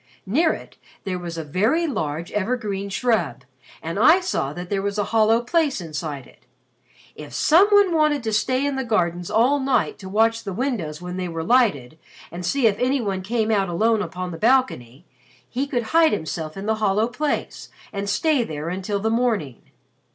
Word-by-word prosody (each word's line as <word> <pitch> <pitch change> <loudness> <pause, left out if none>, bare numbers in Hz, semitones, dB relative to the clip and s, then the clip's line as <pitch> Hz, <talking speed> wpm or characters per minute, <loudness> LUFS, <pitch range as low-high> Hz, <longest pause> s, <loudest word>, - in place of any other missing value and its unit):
Near 310 - +2
it, - - -8 0.3
there 185 -2 -3
was 170 -1 -6
a 165 - -3
very 215 - +1
large 160 - -3
evergreen 205 -2 -2
shrub 230 +3 0 0.4
and - - -3
I 340 +4 +6
saw 355 - -2
that 175 +4 -7
there 195 -1 0
was 200 +1 -3
a 205 - +1
hollow 225 +1 +4
place 295 0 +1
inside 150 -5 -5
it. - - -22 0.7
If - - -10
some 345 +6 +5
one 405 -3 +4
wanted 305 -4 +2
to 220 -1 -2
stay 255 +6 +1
in 285 -1 -1
the 265 - -1
gardens 175 -6 -1
all 240 +7 +3
night 265 -4 0
to 190 - -9
watch 225 +3 +2
the 195 - -5
windows 180 - -3
when 180 +1 -5
they 185 -1 -2
were 165 -1 -4
lighted 165 - +2 0.3
and 175 +2 -7
see 255 +9 +1
if 210 -2 +3
any 260 +3 +1
one 195 -5 -2
came 220 +3 -1
out 195 -3 +1
alone 220 +5 +2
upon 185 -3 -5
the 165 - -8
balcony, 220 - +1 0.4
he 265 - -3
could 245 -4 -1
hide 325 -1 +5
himself 160 -2 -4
in 195 - -6
the 220 0 0
hollow 210 +2 +2
place 290 +5 -3 0.2
and 200 0 -3
stay 305 - +2
there 155 -4 -5
until 190 +3 -3
the 220 +2 -1
morning." 225 - -1
215 Hz, 190 wpm, -22 LUFS, 180-255 Hz, 0.7 s, I